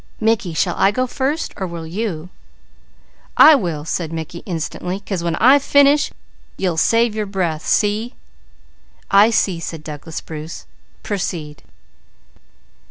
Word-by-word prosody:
"Mickey, 215 -6 0
shall 175 +3 +1
I 195 - +5
go 255 +5 0
first, 275 +5 -2
or 190 - -3
will 170 -1 -7
you?" 180 -2 -4 1.1
"I 315 - +9
will," 175 - 0
replied 165 -2 -2
Mickey 165 +1 -6
instantly, 180 +2 -4
"'cause 195 -3 -4
when 170 -1 -1
I 260 - +6
finish 285 +1 +4 0.5
you'll 180 -4 -1
save 230 +6 +3
your 215 -1 -3
breath. 175 -5 -2
See?" 215 +3 +1 1.0
"I 200 +3 +6
see," 195 -6 +1
said 165 -1 -6
Douglas 155 +1 -7
Bruce. 155 +1 -8 0.4
"Proceed." 170 -7 -4
185 Hz, 130 wpm, -19 LUFS, 165-225 Hz, 1.1 s, I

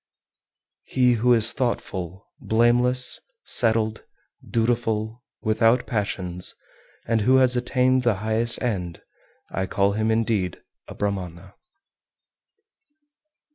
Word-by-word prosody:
386. - - -17
He 125 -3 +3
who 125 +1 +4
is 110 -1 +4
thoughtful, 95 - -3
blameless, 120 +3 +2 0.3
settled, 110 -2 +1 0.4
dutiful, 115 -1 -1 0.2
without 115 +2 +2
passions, 95 -5 -4 0.5
and 115 -1 +1
who 130 +5 +4
has 130 -1 +5
attained 130 +1 +2
the 120 -4 +2
highest 110 +4 -1
end, 90 -8 -2
him - - -29 0.5
I 95 0 -2
call 100 +1 +1
indeed 110 -4 0 0.3
a - - -10
Brahmana. 95 -4 -4
110 Hz, 100 wpm, -24 LUFS, 100-120 Hz, 0.5 s, has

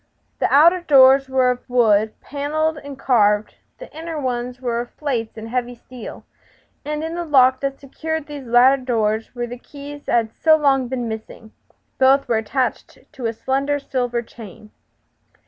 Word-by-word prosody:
The - - 0
outer 340 +6 +5
doors 270 -3 +5
were 260 -1 +3
of 250 +1 -7
wood, 220 -3 +2
panelled 300 +2 -2
and 285 -2 -10
carved; 210 -5 +2 0.2
the - - -12
inner 325 0 -5
ones 245 -2 -3
were 240 -2 -2
plates 240 -7 -3
of 220 - -7
heavy 245 +1 -3
steel, 245 0 -11 0.6
and 300 +1 -4
in 325 +1 -4
the 345 0 -3
lock 260 -4 +4
that 275 0 -3
secured 315 +3 -5
these 290 -4 -9
latter 255 +3 +5
doors 225 -2 -1
were 240 0 -2
the 245 +1 -8
keys 285 +2 -11
that - - 0
had 225 -1 0
so 315 -1 +4
long 270 -4 +2
been 245 -1 -3
missing. 220 0 -8 0.5
Both 270 +1 +4
were 235 -2 +1
attached 250 +4 -2
to 265 -6 -4
a 225 - -2
slender 275 +5 -1
silver 245 -4 -2
chain. 215 -2 -13
260 Hz, 165 wpm, -20 LUFS, 235-285 Hz, 0.6 s, outer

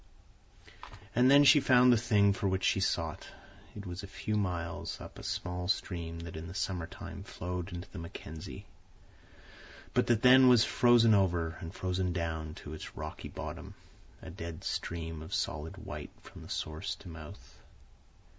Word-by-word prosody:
And 125 +2 +5
then 140 +1 +8
she 145 +1 +8
found 125 -2 +6
the - - +6
thing 105 -3 +3
for 100 0 -1
which 95 0 0
she - - +3
sought. - - -1 0.5
It 105 - -7
was 90 0 -5
a 100 - -8
few 105 +2 -4
miles 90 -5 -2
up - - -10
a - - -10
small 90 0 -3
stream 85 -5 -2
that 85 -1 -8
in 80 +1 -6
the 90 - -9
summer 90 -3 -2
time 95 +1 -9
flowed 90 -2 -5
into 90 +2 -6
the 95 - -7
Mackenzie, 80 -1 -8 1.3
but - - +2
that 115 -2 +2
then 130 +1 +8
was 120 -3 +7
frozen 120 -1 +5
over 85 -5 +2
and 80 - -7
frozen 90 -1 -1
down 80 -2 -3
to 75 -4 -9
its 80 - -9
rocky - - -6
bottom—a 90 - -10
dead 85 -2 -7
stream 80 -2 -3
of 80 +5 -4
solid 75 +2 -3
white - - -7
from - - -12
source 80 +6 -3
to 100 - -14
mouth. 80 -3 -11
90 Hz, 165 wpm, -32 LUFS, 85-105 Hz, 1.3 s, then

